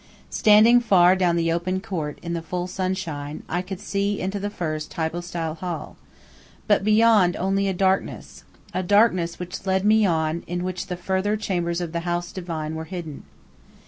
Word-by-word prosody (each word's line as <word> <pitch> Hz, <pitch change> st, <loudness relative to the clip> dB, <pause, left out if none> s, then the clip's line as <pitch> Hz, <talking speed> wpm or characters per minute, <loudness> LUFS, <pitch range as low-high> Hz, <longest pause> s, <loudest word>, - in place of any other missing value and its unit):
Standing 220 Hz, +3 st, +6 dB
far 185 Hz, -5 st, +5 dB
down 180 Hz, -2 st, +2 dB
the 165 Hz, -1 st, +1 dB
open 180 Hz, +3 st, -1 dB
court, 170 Hz, -8 st, -4 dB
in 170 Hz, 0 st, -3 dB
the 170 Hz, -, -2 dB
full 175 Hz, +2 st, -3 dB
sunshine, 180 Hz, -6 st, -4 dB
I 175 Hz, +2 st, -1 dB
could 185 Hz, 0 st, -7 dB
see 200 Hz, 0 st, -1 dB
into 195 Hz, +2 st, -2 dB
the 205 Hz, +1 st, -3 dB
first 155 Hz, -6 st, -4 dB
hypostyle 165 Hz, 0 st, -3 dB
hall, 175 Hz, -1 st, -5 dB, 0.7 s
but 205 Hz, -2 st, +3 dB
beyond 215 Hz, -3 st, +4 dB
only 195 Hz, +2 st, 0 dB
a 190 Hz, -, 0 dB
darkness 190 Hz, +1 st, -1 dB, 0.3 s
a 185 Hz, -, 0 dB
darkness 185 Hz, -3 st, +3 dB
which 180 Hz, +1 st, -7 dB
led 190 Hz, +1 st, +1 dB
me 215 Hz, +1 st, +5 dB
on, 160 Hz, -1 st, 0 dB
in 175 Hz, +1 st, -3 dB
which 185 Hz, -1 st, -4 dB
the 180 Hz, -, -4 dB
further 190 Hz, +4 st, 0 dB
chambers 175 Hz, -4 st, -2 dB
of 170 Hz, -2 st, -4 dB
the 170 Hz, -, -2 dB
house 175 Hz, 0 st, -3 dB
divine 165 Hz, -4 st, -4 dB
were 160 Hz, 0 st, -5 dB
hidden. 165 Hz, -4 st, -7 dB
180 Hz, 175 wpm, -24 LUFS, 170-195 Hz, 0.7 s, Standing